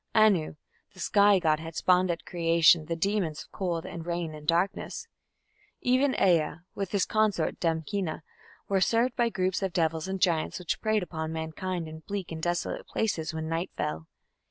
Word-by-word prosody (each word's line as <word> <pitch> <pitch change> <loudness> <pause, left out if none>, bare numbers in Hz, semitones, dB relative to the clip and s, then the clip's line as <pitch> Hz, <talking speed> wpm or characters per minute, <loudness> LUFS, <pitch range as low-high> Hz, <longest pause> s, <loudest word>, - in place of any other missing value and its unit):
Anu, 205 -9 +4 0.4
the - - -14
sky 200 +2 +5
god, 155 -4 +2
had 165 0 -8
"spawned" 185 0 +3
at 170 -1 -3
creation 165 -1 +4
the 165 - -2
demons 175 -3 -1
of - - -24
cold 175 -3 -2
and 165 - -6
rain 170 -1 -3
and 150 -1 -10
darkness. 175 +4 0 0.7
Even 260 +2 +2
Ea 165 -6 +3 0.2
and 200 -1 -2
his 200 -1 +1
consort, 215 -7 +1
Damkina, 165 0 -2 0.4
were 195 -1 +1
served 235 +4 +2
by 240 -1 +2
groups 185 -2 -1
of 190 -2 -2
devils 160 -1 0
and 190 0 -3
giants, 170 -4 +1
which 180 -2 -3
preyed 215 -2 +1
upon 160 -2 -4
mankind 160 +2 -4
in 160 0 -8
bleak 195 +1 -5
and 160 -1 -5
desolate 175 +1 -2
places 170 -8 -1
when 160 0 -4
night 165 +2 -2
fell. 80 +1 -3
175 Hz, 175 wpm, -28 LUFS, 160-195 Hz, 0.7 s, sky